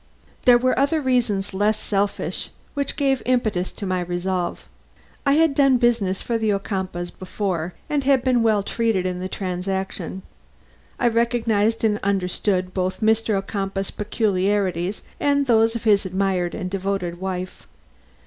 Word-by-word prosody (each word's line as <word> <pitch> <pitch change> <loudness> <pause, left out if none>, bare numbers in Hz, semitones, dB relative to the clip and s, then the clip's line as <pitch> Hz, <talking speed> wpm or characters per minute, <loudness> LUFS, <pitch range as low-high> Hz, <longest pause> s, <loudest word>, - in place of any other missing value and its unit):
There 245 -2 +8
were 255 +2 +1
other 285 +4 +2
reasons 235 -8 0
less 205 +2 +2
selfish 200 0 -2 0.2
which 280 -1 -1
gave 270 -4 +1
impetus 215 -8 0
to 200 - -6
my 185 -1 0
resolve. 175 0 -2 0.6
I 280 - +5
had 320 0 +4
done 275 -2 +4
business 230 -6 +1
for 230 -1 -1
the 220 -1 +1
Ocumpaughs 190 -3 -3
before 185 -3 -3
and 295 -1 0 0.2
been 250 -2 +3
well 215 -3 +3
treated 225 -4 0
in 180 -1 -2
the 185 +1 -4
transaction. 190 0 -3 0.8
I 245 - +3
recognized 230 -2 +1
and 210 -1 +2
understood 185 -1 0
both 185 +2 -2
Mr. 220 0 +2
Ocumpaugh's 195 -1 -3
peculiarities 200 -3 0 0.2
and 285 -1 +2
those 225 -2 +3
of 235 - -4
his 210 -3 +4
admired 190 -2 -1
and 185 - -3
devoted 190 -3 -2
wife. 185 -1 -5
200 Hz, 140 wpm, -23 LUFS, 185-230 Hz, 0.8 s, There